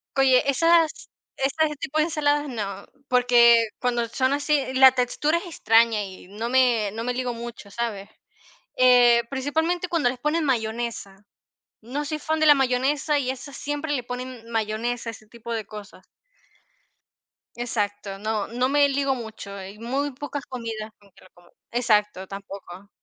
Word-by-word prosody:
Oye, 265 -1 +4
esas 330 +3 +4 0.5
esas 300 +3 0
tipo 300 - -4
de 310 - +4
ensaladas 295 -2 0
no, 200 -6 -5 0.2
porque 240 -2 +5
cuando 240 -2 0
son 260 +2 0
así 290 0 +1
la 265 0 +8
textura 280 +6 0
es 365 - -10
extraña 225 -8 +3
y 190 -2 -10
no 220 +4 -5
me 245 -5 +3
no 225 +2 -5
me 245 0 -2
ligo 250 -1 -2
mucho, 230 -3 -9
¿sabes? 215 -3 -4 0.7
Eh, 245 -2 +6
principalmente 320 +6 -1
cuando 325 -8 +1
les 250 - -6
ponen 305 +4 0
mayonesa. 225 -5 -3 0.6
No 265 +7 -4
soy 305 +1 -3
fan 315 +1 -2
de 310 - +4
la 295 - +9
mayonesa 275 +3 +1
y 260 -2 -1
esas 270 +2 -7
siempre 290 +1 -3
le 255 -4 -1
ponen 245 -1 -7
mayonesa, 230 +2 -2
ese 220 -1 -13
tipo 235 +1 -9
de 220 - -3
cosas. 210 -1 -11 1.5
Exacto. 205 -4 -3
No 215 0 -2
no 245 +2 0
me 285 0 +4
ligo 275 0 +1
mucho. 220 -4 -8
Hay 195 +1 -9
muy 270 +6 -2
pocas 285 +1 -6
comidas 225 -4 -6
con 200 -1 -23
que - - -21
lo 185 - -18
como. 175 0 -22 0.2
Exacto, 210 -5 +1
tampoco. 195 -1 -10
245 Hz, 160 wpm, -24 LUFS, 220-280 Hz, 1.5 s, la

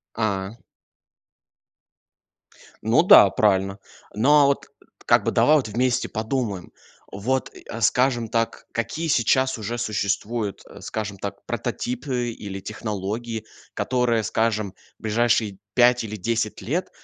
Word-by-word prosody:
А. 100 -2 -1 2.3
Ну, - - +4
да, - - +8
правильно. 95 -1 +1 0.4
Но, 145 +7 +5
а - - +6
вот, 140 - 0 0.4
как - - +4
бы, - - +1
давай 155 +1 +5
вот 130 -7 0
вместе 120 +3 0
подумаем. 110 -4 -3 0.4
Вот, 125 +7 -2 0.2
а, 115 - -5
скажем 120 +1 +2
так, 115 0 -2
какие 155 +8 -3
сейчас 130 0 +2
уже 115 +3 -4
существуют, 105 -1 -2
э, - - -13
скажем 105 -2 -4
так, 100 +1 -7
прототипы 125 -1 -3
или 100 -3 -7
технологии, 110 +2 -4 0.3
которые, 125 -3 +1
скажем, 110 -2 -1 0.2
в - - -28
ближайшие 110 -2 +1 0.2
5 125 -1 +4
или 110 0 -5
10 110 +2 -2
лет 175 +9 -2
115 Hz, 125 wpm, -23 LUFS, 105-125 Hz, 2.3 s, да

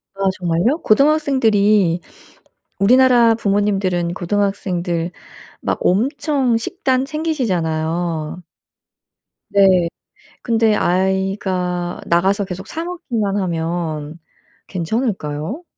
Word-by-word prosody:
아 195 - -8 0.2
정말요? 180 - +1
고등학생들이 215 - +3 0.8
우리나라 240 +2 +5
부모님들은 195 -5 0
고등학생들 180 -3 -1 0.5
막 - - -2
엄청 260 - +1
식단 255 +3 -1
챙기시잖아요. 175 - -2 1.1
네. 190 -3 +4 0.5
근데 225 -2 +2
아이가 185 -1 -1
나가서 190 +4 +2
계속 190 +1 -7
사 325 - -4
먹기만 240 - -2
하면 165 -3 -3 0.5
괜찮을까요? 185 - -3
195 Hz, 215 characters per minute, -19 LUFS, 175-230 Hz, 1.1 s, 우리나라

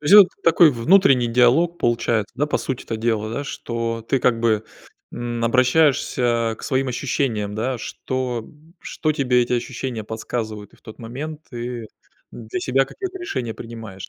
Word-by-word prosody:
То 150 - -16
есть 190 - +6
вот 205 -3 +10 0.2
такой 165 -1 +6
внутренний 135 0 +4
диалог 130 +9 +3
получается, 115 -2 0
да? 150 +3 +1
По - - 0
сути-то 125 -4 -4
дела, 110 -1 -1
да, 140 - -2
что 115 -3 -4
ты 135 - +2
как 120 -2 +2
бы, 110 -2 +2 0.5
м, 120 -1 -3
обращаешься 125 -3 +2
к - - -13
своим 135 0 0
ощущениям, 120 -5 -1
да, 120 +3 -2
что 130 -1 -3
м, 155 +3 -20
что 155 - -2
тебе 125 -4 +2
эти 125 +1 -1
ощущения 120 -2 -4
подсказывают? 110 -1 -5
И - - -22
в - - -30
тот 110 - -11
момент 145 +7 -6
ты 120 -1 -5 0.4
для 115 +10 -6
себя 135 -1 +2
какое-то 380 - -6
решение 125 - -4
принимаешь, 115 -5 -9
120 Hz, 165 wpm, -22 LUFS, 115-140 Hz, 0.5 s, вот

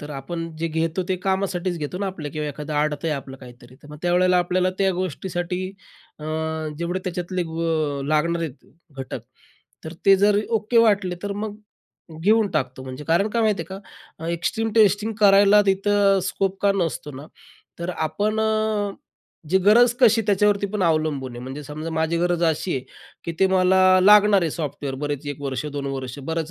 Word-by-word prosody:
तर 145 0 -8
आपण 165 +4 -5
जे 165 +1 -1
घेतो 160 +3 -1
ते 185 - 0
कामासाठीच 190 -2 -1
घेतो 155 +4 -4
ना, 200 - -2
आपलं 165 -6 -5
किंवा 150 -1 -3
एखादं 150 +1 -6
आडत 150 0 -1
आहे 160 - +1
आपलं 135 -1 -7
काहीतरी, 125 -1 -14
तर 145 - -14
मग 150 - -9
त्यावेळेला 180 +1 +3
आपल्याला 180 +1 +1
त्या 195 -1 +2
गोष्टीसाठी 180 +1 -3 0.5
अ, 150 - -9 0.5
जेवढे 175 +2 -2
त्याच्यातले 180 0 -3
ग 165 -1 -7 0.4
अ, 135 - -5
लागणार 170 +2 +1
आहेत, 150 -4 -7 0.3
घटक, 130 - -5 0.6
तर 160 - -6
ते 195 0 +8
जर 205 +1 +3
ओके 225 +1 +1
वाटले, 205 -5 +3
तर 205 - -3
मग 205 +1 -5 0.6
घेऊन 215 +3 +3
टाकतो. 130 -3 -2
म्हणजे 130 +2 -8
कारण 175 +6 +3
काय 230 +1 0
माहिती 215 -2 +1
आहे 190 - -6 0.4
का, 165 +1 -5
एक्स्ट्रीम 220 +7 -1
टेस्टिंग 210 0 +3
करायला 200 0 +6
तिथं 195 0 +3
स्कोप 195 0 -2
का 200 -1 +4
नसतो 165 -5 -2
ना, 140 +3 -9 0.5
तर 170 +1 -3 0.2
आपण 215 +6 -1
अ, 215 -2 0 0.6
जी 190 - +3
गरज 235 +4 +6
कशी 225 -2 +5
त्याच्यावरती 205 0 +2
पण 210 - -1
अवलंबून 155 -6 0
आहे. - - -7
म्हणजे 135 +4 -7
समजा 155 +3 -6
माझी 160 +1 0
गरज 175 0 0
अशी 165 +1 0
आहे, 130 - -4 0.4
की 170 - -3
ते 190 - +6
मला 190 0 +3 0.2
लागणार 205 +1 +6
आहे, 165 - 0
सॉफ्टवेअर, 145 -3 -4
बरेच 145 0 -4
1 145 -1 -5
वर्ष, 135 -1 -3
2 140 -1 -3
वर्ष, 135 -1 -5
बरेच 160 -1 -2
175 Hz, 180 wpm, -23 LUFS, 150-200 Hz, 0.6 s, ते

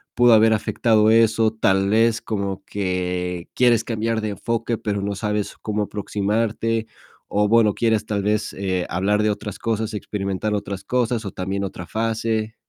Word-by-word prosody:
pudo 120 -1 +6
haber 110 0 +6
afectado 110 0 +2
eso? 110 -1 +4
Tal 95 -3 +2
vez, 115 +1 +3
como 100 -3 -3
que 90 -2 -3
quieres 120 -3 +3
cambiar 115 0 -1
de 110 - -2
enfoque, 115 +3 -2
pero 100 -2 -2
no 100 0 -2
sabes 105 0 -2
cómo 105 -1 -1
aproximarte, 110 +2 -1 0.5
o 105 +1 +3
bueno, 110 -1 +4
quieres 110 -1 +1
tal 100 -2 -2
vez, 105 +1 0
eh, 95 -2 -2
hablar 100 +4 +1
de 110 - +2
otras 105 -1 -4
cosas, 110 -1 -2
experimentar 100 0 -3
otras 100 -1 -4
cosas, 120 0 0
o 100 - -4
también, 95 +2 -3
otra 90 -3 -6
fase. 110 0 -1
105 Hz, 160 wpm, -22 LUFS, 100-115 Hz, 0.5 s, pudo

